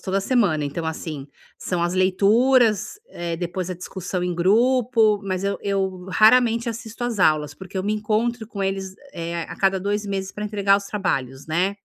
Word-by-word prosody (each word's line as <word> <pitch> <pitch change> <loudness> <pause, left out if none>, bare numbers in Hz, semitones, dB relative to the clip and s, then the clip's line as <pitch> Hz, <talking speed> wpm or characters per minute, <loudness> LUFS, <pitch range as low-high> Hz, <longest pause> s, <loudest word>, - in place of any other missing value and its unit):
toda 195 +1 -1
semana, 195 - +1
então, 160 +3 -4
assim, 155 -3 -5 0.3
são 180 -2 -2
as 175 +1 0
leituras, 210 +4 +3
eh, 170 - -4
depois 175 +1 -4
a 185 - -3
discussão 180 0 -5
em 180 0 -1
grupo, 225 +3 +3
mas 185 -1 -2
eu 200 0 -1
eu, 190 -2 -2
raramente, 230 +4 +4
assisto 230 0 -7
às 235 -4 -2
aulas, 150 -4 +2
porque 190 +2 -10
eu - - -1
me 210 - 0
encontro 220 +2 -1
com 200 -2 -5
eles, 195 -1 -3 0.2
eh, 170 0 -4
a - - -8
cada 195 -1 +2
2 205 +1 -2
meses 195 -1 -3
pra 210 - -5
entregar 200 -1 +2
os 200 - -5
trabalhos, 135 -11 -2
né. 180 +5 0
195 Hz, 180 wpm, -23 LUFS, 175-215 Hz, 0.3 s, raramente